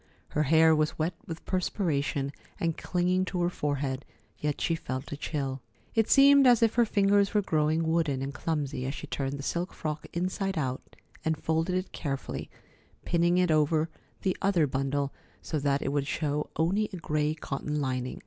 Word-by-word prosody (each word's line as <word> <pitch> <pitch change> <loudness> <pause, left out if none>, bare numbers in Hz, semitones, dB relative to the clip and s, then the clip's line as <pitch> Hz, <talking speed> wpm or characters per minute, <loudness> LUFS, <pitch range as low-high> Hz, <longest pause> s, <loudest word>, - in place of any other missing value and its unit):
Her 150 - 0
hair 160 0 +6
was 155 0 0
wet 160 +3 0
with 165 -1 -7
perspiration 145 -7 -1 0.3
and 165 -2 0
clinging 180 +1 +1
to 180 -1 -1
her 175 - +1
forehead, 140 -4 -2 0.4
yet 150 -1 -1
she 170 - +1
felt 130 -4 -4
a - - -2
chill. 140 -3 -3 0.3
It 225 -1 +2
seemed 280 -1 +7
as 240 -2 +6
if 225 - +4
her 240 0 +4
fingers 200 -1 +3
were 205 - +4
growing 160 -1 +1
wooden 160 -5 +1
and 140 +1 -4
clumsy 140 -3 -2
as 135 - -3
she - - -6
turned 135 -1 -3
the 140 - -7
silk 175 +5 -2
frock 155 -1 -4
inside 185 +2 -2
out 130 -4 -3 0.3
and 160 -1 0
folded 160 +4 0
it 185 +1 -2
carefully, 135 -3 -4 0.6
pinning 170 +1 +3
it 180 -2 +3
over 155 +1 +2 0.3
the 190 - +1
other 190 -5 +3
bundle, 135 +1 -1 0.3
so 155 - -3
that 140 0 +1
it - - -1
would 140 -1 0
show 150 -1 -1
only 195 +7 +1
a 185 - -5
gray 155 -2 0
cotton 150 0 -3
lining. 130 -2 -2
155 Hz, 180 wpm, -29 LUFS, 145-180 Hz, 0.6 s, seemed